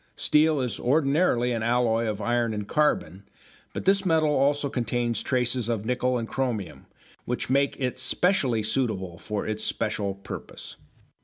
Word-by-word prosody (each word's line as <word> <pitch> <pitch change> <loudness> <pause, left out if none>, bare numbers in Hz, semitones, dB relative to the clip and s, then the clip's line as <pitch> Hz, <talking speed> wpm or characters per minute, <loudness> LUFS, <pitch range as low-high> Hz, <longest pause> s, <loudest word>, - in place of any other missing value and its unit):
Steel 155 0 +3
is 125 -3 -3
ordinarily 135 -2 +2
an 115 -2 -1
alloy 115 -1 +1
of 105 -1 -3
iron 120 -1 0
and 105 -1 -4
carbon, 105 - 0 0.5
but - - -6
this 195 +1 +3
metal 160 -4 +2
also 145 +1 +2
contains 120 -2 -1
traces 125 -2 0
of 110 -3 -2
nickel 125 +1 0
and 115 -1 -3
chromium, 115 -11 -3 0.4
which 125 +1 -3
make 140 +1 +1
it 125 -2 -2
specially 135 - +1
suitable 105 -7 -2
for 105 -1 -4
its 110 0 -2
special 100 -2 -1
purpose. 100 - -9
120 Hz, 150 wpm, -26 LUFS, 110-140 Hz, 0.5 s, Steel